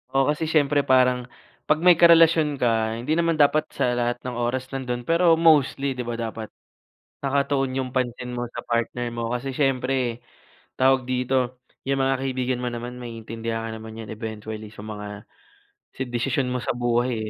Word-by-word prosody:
Oo, 135 Hz, -, +5 dB
kasi 160 Hz, +1 st, -2 dB
syempre 145 Hz, -2 st, +2 dB
parang 125 Hz, -1 st, +3 dB, 0.4 s
'pag 155 Hz, +2 st, +2 dB
may 180 Hz, -2 st, +6 dB
karelasyon 165 Hz, -3 st, +6 dB
ka, 115 Hz, -3 st, +1 dB
hindi 120 Hz, +6 st, -4 dB
naman 165 Hz, 0 st, +2 dB
dapat 155 Hz, +1 st, +3 dB
sa 125 Hz, -, +1 dB
lahat 120 Hz, 0 st, 0 dB
ng 125 Hz, -1 st, -4 dB
oras 130 Hz, +2 st, -2 dB
nando'n, 125 Hz, -2 st, -3 dB
pero 165 Hz, +1 st, +4 dB
mostly, 145 Hz, -4 st, +3 dB
di 125 Hz, -, -7 dB
ba 120 Hz, -, -2 dB
dapat 115 Hz, -1 st, -5 dB, 0.8 s
nakatuon 135 Hz, -1 st, 0 dB
'yong 130 Hz, -1 st, -2 dB
pansin 125 Hz, -1 st, -2 dB
mo 120 Hz, -, -2 dB
sa 120 Hz, -, -7 dB
partner 120 Hz, +1 st, -2 dB
mo 115 Hz, 0 st, -3 dB
kasi 130 Hz, +3 st, -3 dB
siyempre 130 Hz, -3 st, 0 dB, 0.5 s
tawag 130 Hz, -1 st, +3 dB
dito, 125 Hz, 0 st, 0 dB, 0.3 s
yung 135 Hz, -1 st, +1 dB
mga 135 Hz, -1 st, +1 dB
kaibigan 130 Hz, -1 st, -1 dB
mo 125 Hz, -, -2 dB
naman 120 Hz, +1 st, -6 dB
maiintindihan 115 Hz, -1 st, -5 dB
ka 115 Hz, -, -4 dB
naman 110 Hz, 0 st, -9 dB
'yan 110 Hz, -2 st, -7 dB
eventually 110 Hz, 0 st, -6 dB
sa 105 Hz, 0 st, -11 dB
mga 105 Hz, -1 st, -7 dB, 0.9 s
desisyon 125 Hz, +2 st, 0 dB
mo 125 Hz, -, -1 dB
sa 120 Hz, -, -2 dB
buhay, 120 Hz, +1 st, +1 dB
125 Hz, 165 wpm, -24 LUFS, 120-135 Hz, 0.9 s, may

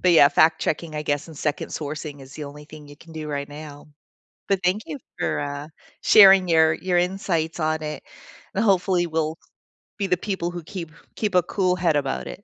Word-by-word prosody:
but, 180 Hz, -, +4 dB
yeah, 150 Hz, -4 st, +8 dB
fact 160 Hz, 0 st, +3 dB
checking, 155 Hz, 0 st, -2 dB
I 150 Hz, -, -2 dB
guess, 145 Hz, +1 st, -2 dB
and 160 Hz, -, -11 dB
second 145 Hz, 0 st, -2 dB
sourcing 150 Hz, -1 st, -6 dB
is 135 Hz, 0 st, -13 dB
the 150 Hz, -, -7 dB
only 145 Hz, +1 st, -10 dB
thing 150 Hz, -1 st, -13 dB
you 145 Hz, -, -13 dB
can 165 Hz, +1 st, -15 dB
do 155 Hz, -1 st, -6 dB
right 140 Hz, -1 st, -3 dB
now, 145 Hz, 0 st, -10 dB, 0.6 s
but 195 Hz, -2 st, +1 dB
thank 185 Hz, +4 st, +1 dB
you 290 Hz, -, -6 dB, 0.2 s
for, -, -, -1 dB
uh, 145 Hz, +1 st, -5 dB, 0.3 s
sharing 195 Hz, -3 st, +8 dB
your 160 Hz, -2 st, +4 dB
your 180 Hz, +1 st, 0 dB
insights 175 Hz, -3 st, -1 dB
on 155 Hz, -1 st, 0 dB
it, 150 Hz, 0 st, -5 dB, 0.5 s
and, 200 Hz, -, +1 dB
hopefully, 185 Hz, -3 st, +2 dB
we'll 160 Hz, 0 st, -2 dB, 0.6 s
be 200 Hz, -, -1 dB
the 180 Hz, -, +3 dB
people 190 Hz, -3 st, -3 dB
who 175 Hz, -1 st, -7 dB
keep 165 Hz, -1 st, -7 dB, 0.3 s
keep 210 Hz, -4 st, -1 dB
a 180 Hz, -, +5 dB
cool 185 Hz, 0 st, 0 dB
head 175 Hz, -4 st, +1 dB
about 135 Hz, -2 st, -2 dB
it. 200 Hz, -, -9 dB
160 Hz, 210 wpm, -23 LUFS, 150-180 Hz, 0.6 s, yeah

